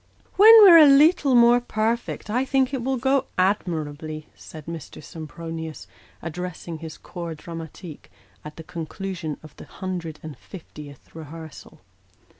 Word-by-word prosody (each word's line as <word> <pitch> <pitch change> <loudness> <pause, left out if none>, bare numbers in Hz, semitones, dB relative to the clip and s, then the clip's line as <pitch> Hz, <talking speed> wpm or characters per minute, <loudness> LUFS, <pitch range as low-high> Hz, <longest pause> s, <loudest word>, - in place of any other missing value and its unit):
" - - -35
When 440 +2 +9
we're 345 -4 +9
a 305 - +8
leetle 285 -1 +5
more 240 0 +5
perfect, 225 -1 -3
I 250 +4 +1
think 265 0 0
it 260 -3 -3
will 265 +1 -1
go 265 +2 0
admirably," 155 -5 -2
said 155 -2 -12
Mr. 165 -2 -9
Sempronius, 160 0 -8 0.4
addressing 170 0 -6
his 160 -1 -9
corps 170 -2 -8
dramatique, 165 0 -10 0.3
at 150 0 -10
the 160 - -10
conclusion 165 0 -6
of 155 - -14
the - - -11
hundred 175 -5 -6
and 155 -2 -8
fiftieth 150 -6 -13
rehearsal. 160 - -11
170 Hz, 140 wpm, -23 LUFS, 160-240 Hz, 0.4 s, When